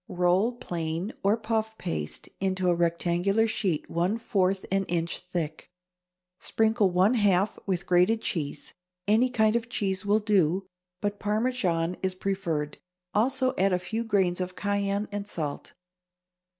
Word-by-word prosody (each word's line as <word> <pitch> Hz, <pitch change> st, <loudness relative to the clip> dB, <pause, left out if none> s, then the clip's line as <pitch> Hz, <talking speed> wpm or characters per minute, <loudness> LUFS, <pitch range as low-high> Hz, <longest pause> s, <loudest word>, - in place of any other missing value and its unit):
= -, -, -59 dB, 0.2 s
Roll 190 Hz, +7 st, +3 dB
plain 170 Hz, -3 st, -4 dB
or 200 Hz, +3 st, +3 dB
puff 220 Hz, 0 st, -2 dB
paste 75 Hz, -6 st, -3 dB
into 185 Hz, -1 st, 0 dB
a 175 Hz, -, +5 dB
rectangular 175 Hz, +5 st, +1 dB
sheet 195 Hz, -8 st, -1 dB
one 180 Hz, +6 st, 0 dB
fourth 195 Hz, -4 st, 0 dB
an 195 Hz, 0 st, +2 dB
inch 170 Hz, -1 st, -1 dB
thick. 170 Hz, -4 st, -5 dB, 0.7 s
Sprinkle 220 Hz, -2 st, +2 dB
one 185 Hz, +5 st, +3 dB
half 200 Hz, -3 st, +2 dB
with 180 Hz, -2 st, -1 dB
grated 180 Hz, +5 st, +3 dB
cheese 160 Hz, -10 st, -3 dB, 0.3 s
(any 225 Hz, +5 st, +4 dB
kind 220 Hz, -3 st, +2 dB
of 235 Hz, 0 st, -1 dB
cheese 190 Hz, -5 st, -1 dB
will 205 Hz, +1 st, +3 dB
do, 195 Hz, -4 st, +2 dB, 0.4 s
but 205 Hz, 0 st, -2 dB
Parmesan 205 Hz, -6 st, 0 dB
is 185 Hz, -1 st, -1 dB
preferred); 175 Hz, -7 st, -2 dB, 0.3 s
also 260 Hz, +4 st, +2 dB
add 190 Hz, 0 st, +3 dB
a -, -, +3 dB
few 220 Hz, +6 st, -3 dB
grains 190 Hz, -5 st, +1 dB
of 180 Hz, 0 st, -4 dB
cayenne 200 Hz, +1 st, -1 dB
and 205 Hz, 0 st, -4 dB
salt. 155 Hz, -7 st, -4 dB
195 Hz, 145 wpm, -27 LUFS, 175-215 Hz, 0.7 s, a